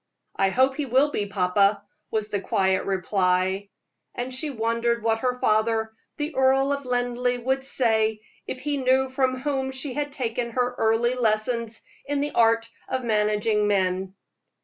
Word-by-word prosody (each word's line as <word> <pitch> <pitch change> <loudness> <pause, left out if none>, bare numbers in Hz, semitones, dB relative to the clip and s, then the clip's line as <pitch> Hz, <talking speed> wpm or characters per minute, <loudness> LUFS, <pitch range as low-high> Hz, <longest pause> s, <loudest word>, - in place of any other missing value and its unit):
"I 195 0 +2
hope 260 +6 +2
he 295 -2 -2
will 265 +4 +3
be, 205 -6 -2
papa," 200 +1 +2 0.3
was 215 -1 -2
the 205 -2 -2
quiet 190 -1 +1
reply. 190 +1 0 0.5
And 250 +1 -4
she 295 +4 -3
wondered 235 -1 -1
what 225 0 +1
her 250 +1 -1
father, 220 0 +1 0.2
the 300 +1 -3
Earl 270 +1 +3
of 280 -2 -5
Linleigh, 245 0 0
would 265 +2 0
say 220 -5 +1 0.3
if 255 - -5
he 290 +1 -1
knew 260 0 +2
from 260 -1 +1
whom 265 0 -2
she 265 0 -5
had 290 +1 -2
taken 235 -3 -3
her 250 0 0
early 225 +2 +2
lessons 230 -1 -1 0.2
in 285 0 0
the 290 +1 -1
art 230 0 +3 0.2
of 260 -1 -2
managing 210 -1 +1
men. 190 -1 0
235 Hz, 160 wpm, -25 LUFS, 210-260 Hz, 0.5 s, will